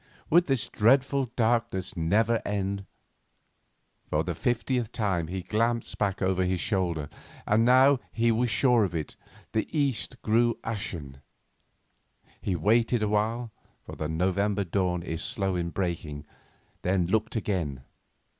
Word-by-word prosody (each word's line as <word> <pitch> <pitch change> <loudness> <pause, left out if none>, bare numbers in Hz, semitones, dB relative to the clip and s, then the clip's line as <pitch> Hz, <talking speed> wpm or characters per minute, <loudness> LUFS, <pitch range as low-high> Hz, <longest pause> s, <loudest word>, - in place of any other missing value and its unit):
Would 175 +3 +5
this 135 -5 0
dreadful 130 +4 +3
darkness 115 -6 0
never 110 +8 +2
end? 100 -1 -2 1.2
For 75 +1 +1
the 85 +1 -2
fiftieth 120 - -1
time 95 -7 -1
he 95 +1 -4
glanced 115 +4 0
back 100 -2 0
over 95 0 +2
his 90 0 0
shoulder, 85 -7 -1 0.4
and 110 +2 +3
now, 130 +2 +6
he 115 +1 +2
was 120 +2 +1
sure 120 -1 +4
of 90 -4 -2
it, 80 -2 -4 0.4
the 110 - 0
east 135 -6 -1
grew 115 +1 +2
ashen. 80 -11 -5 1.2
He 95 - -1
waited 115 +6 +2
awhile, 110 +3 0 0.3
for - - -9
the 75 - -4
November 95 +5 +1
dawn 90 -1 -1
is 80 -1 -4
slow 95 -2 -1
in 85 -1 -1
breaking, 85 -5 -3 0.6
then 90 -1 +1
looked 110 +6 0
again. 85 - -2
100 Hz, 135 wpm, -27 LUFS, 90-115 Hz, 1.2 s, now